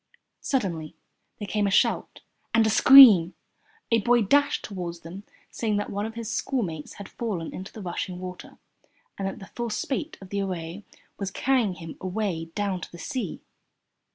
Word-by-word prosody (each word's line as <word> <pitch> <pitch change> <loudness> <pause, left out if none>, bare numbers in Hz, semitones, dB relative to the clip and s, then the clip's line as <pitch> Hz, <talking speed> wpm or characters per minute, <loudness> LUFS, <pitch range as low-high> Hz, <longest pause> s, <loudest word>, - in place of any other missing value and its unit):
Suddenly 175 - -2 0.4
there 205 - -6
came 205 0 0
a - - +1
shout 195 - +1 0.3
and 225 0 +5
a 220 - +2
scream. 220 -8 +9 0.6
A 230 - +5
boy 240 +2 +3
dashed 285 +7 +2
toward 180 -4 -5
them 185 +5 -9 0.3
saying 215 -3 -1
that 205 - -3
one 205 +2 -2
of 225 - -9
his 230 -1 -5
schoolmates 180 - -3
had 200 - -9
fallen 195 -9 -4
into 190 +2 -7
the 215 - -9
rushing 180 0 -4
water, 180 0 -9 0.6
and 195 - -1
that 195 - -5
the 200 - -10
full 240 -1 -3
spate 270 +7 -3
of 190 - -12
the 200 0 -2
Aray 180 0 -5 0.4
was 195 -2 -2
carrying 235 -2 +1
him 165 -2 -9
away 185 -3 -2
down 200 -3 -1
to - - -8
the 175 - -10
sea. 260 - -4
200 Hz, 175 wpm, -26 LUFS, 180-225 Hz, 0.6 s, scream